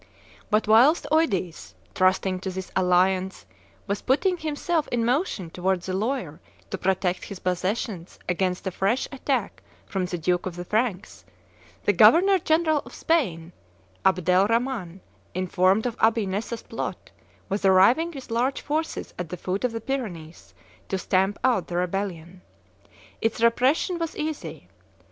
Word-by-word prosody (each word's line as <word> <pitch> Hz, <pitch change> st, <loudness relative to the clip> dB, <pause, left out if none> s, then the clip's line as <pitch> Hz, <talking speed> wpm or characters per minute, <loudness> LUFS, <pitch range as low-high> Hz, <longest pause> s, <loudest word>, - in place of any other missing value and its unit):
But 215 Hz, 0 st, +2 dB
whilst 245 Hz, +10 st, +5 dB
Eudes, 195 Hz, -, 0 dB, 0.2 s
trusting 185 Hz, -1 st, +2 dB
to 190 Hz, -, -4 dB
this 190 Hz, 0 st, -6 dB
alliance, 185 Hz, +1 st, +2 dB, 0.4 s
was 200 Hz, 0 st, -2 dB
putting 360 Hz, +9 st, +2 dB
himself 315 Hz, 0 st, -1 dB
in 235 Hz, -2 st, 0 dB
motion 240 Hz, -, -1 dB
towards 185 Hz, 0 st, -1 dB
the 185 Hz, -, -3 dB
Loire 200 Hz, -, -2 dB, 0.3 s
to 190 Hz, -, -2 dB
protect 185 Hz, -1 st, 0 dB
his 200 Hz, -, -7 dB
possessions 185 Hz, 0 st, -3 dB
against 180 Hz, +1 st, -1 dB
a 190 Hz, -, -1 dB
fresh 200 Hz, +8 st, 0 dB
attack 265 Hz, -4 st, -2 dB, 0.2 s
from 190 Hz, -2 st, -2 dB
the 175 Hz, -, -3 dB
Duke 175 Hz, +2 st, 0 dB
of 180 Hz, -, -6 dB
the 175 Hz, 0 st, -6 dB
Franks, 215 Hz, -2 st, -2 dB, 0.6 s
the -, -, +3 dB
governor 385 Hz, +3 st, +6 dB
general 315 Hz, -1 st, +2 dB
of -, -, -12 dB
Spain, 180 Hz, -, 0 dB, 0.5 s
Abdel 185 Hz, +1 st, +3 dB
Rhaman, 230 Hz, -6 st, -1 dB, 0.3 s
informed 185 Hz, +3 st, +2 dB
of 240 Hz, -2 st, -2 dB
Abi 225 Hz, -1 st, +3 dB
Nessa's 205 Hz, +4 st, -4 dB
plot, -, -, -6 dB, 0.4 s
was 200 Hz, 0 st, -2 dB
arriving 195 Hz, -, +5 dB
with 270 Hz, -7 st, -10 dB
large 250 Hz, +4 st, 0 dB
forces 315 Hz, +2 st, -3 dB
at 175 Hz, -3 st, -4 dB
the 180 Hz, -, -5 dB
foot 185 Hz, +5 st, -3 dB
of 250 Hz, -, +1 dB
the 225 Hz, 0 st, -5 dB
Pyrenees, 190 Hz, -12 st, -6 dB, 0.3 s
to 190 Hz, -, 0 dB
stamp 190 Hz, +2 st, +1 dB
out 245 Hz, -8 st, +2 dB
the 175 Hz, -, -3 dB
rebellion. 180 Hz, -1 st, -3 dB, 0.8 s
Its 225 Hz, 0 st, 0 dB
repression 260 Hz, +10 st, +2 dB
was 330 Hz, -1 st, -4 dB
easy. 310 Hz, 0 st, -5 dB
195 Hz, 145 wpm, -25 LUFS, 185-255 Hz, 0.8 s, governor